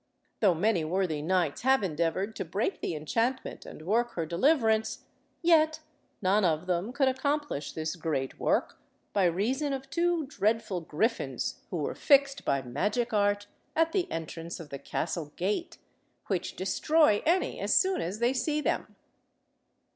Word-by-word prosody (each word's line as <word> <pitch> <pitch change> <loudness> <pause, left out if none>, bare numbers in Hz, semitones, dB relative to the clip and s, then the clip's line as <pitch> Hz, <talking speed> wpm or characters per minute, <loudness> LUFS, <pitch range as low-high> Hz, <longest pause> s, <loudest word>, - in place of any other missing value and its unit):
Though 195 -5 +4
many 185 0 +2
worthy 165 -2 0
knights 170 -2 0
have 265 -2 +3
endeavoured 180 +5 -1
to - - -2
break 200 - -2
the 165 - -2
enchantment 230 - -2
and - - -10
work 235 +5 +1
her 165 - -2
deliverance, 220 - +2 0.4
yet 315 -2 +4 0.4
none 200 +3 +3
of 165 -1 +1
them 180 +5 -1
could 270 +1 +2
accomplish 280 - -1
this 160 +2 -3
great 155 -6 -3
work, - - 0 0.3
by 195 -2 +3
reason 250 - 0
of 270 0 -6
two 345 -2 +1
dreadful 215 -7 0
griffins 215 +10 -1
who - - -3
were - - -2
fixed 280 -1 +3
by 140 -1 0
magic 205 - -1
art 205 0 +2 0.3
at 325 0 +3
the 365 0 0
entrance 165 +1 -5
of 160 -3 -9
the 140 - -5
castle 150 +1 -3
gate, 205 - -2 0.5
which 185 -3 -2
destroy 215 - +3
any 350 +4 +1
as - - +2
soon 380 0 +2
as 180 +5 -3
they 240 +3 +2
see 295 +4 0
them. - - -2
205 Hz, 155 wpm, -29 LUFS, 170-270 Hz, 0.5 s, Though